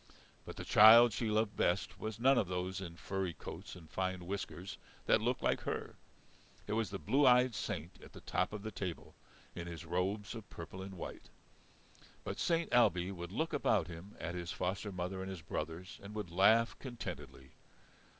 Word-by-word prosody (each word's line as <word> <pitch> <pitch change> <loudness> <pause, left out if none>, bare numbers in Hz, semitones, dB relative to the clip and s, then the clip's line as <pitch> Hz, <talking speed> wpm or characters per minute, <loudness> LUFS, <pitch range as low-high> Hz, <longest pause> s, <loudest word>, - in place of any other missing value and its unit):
But - - -7
the - - -6
child 115 +2 +9
she 115 +1 -1
loved 110 -1 +1
best 90 +1 0
was 110 0 -5
none 135 +2 +5
of 100 - 0
those 90 +1 -3
in 85 -3 -7
furry 95 -1 -3
coats - - -8
and 85 -3 -12
fine 95 +1 -2
whiskers 95 0 -5 0.3
that 110 - +4
looked 120 +3 0
like - - +2
her; - - -4 0.7
it 105 - -3
was 110 -3 0
the - - -4
blue 135 - +3
eyed 125 0 +6
Saint 85 -3 -5
at - - -14
the - - -11
top 90 - 0
of 105 -1 -6
the 110 - -4
table 90 -3 -5 0.4
in 85 0 -6
his 85 -1 -7
robes 95 +5 -1
of 115 -3 -9
purple 85 +3 -8
and 95 0 -7
white. 85 - -8 0.9
But - - -5
Saint 165 -1 +1
Ailbe 90 -6 +4
would 85 -1 -7
look 160 +10 -1
about 95 -6 +2
him 90 +4 -10
at 85 - -4
his 90 -1 -4
foster 95 +3 -2
mother 90 +1 -3
and 95 - -5
his 95 -4 -7
brothers 80 +5 -5
and 100 +2 -9
would 105 -5 -4
laugh 110 +6 +5
contentedly. 120 - -7
95 Hz, 190 wpm, -35 LUFS, 90-110 Hz, 0.9 s, child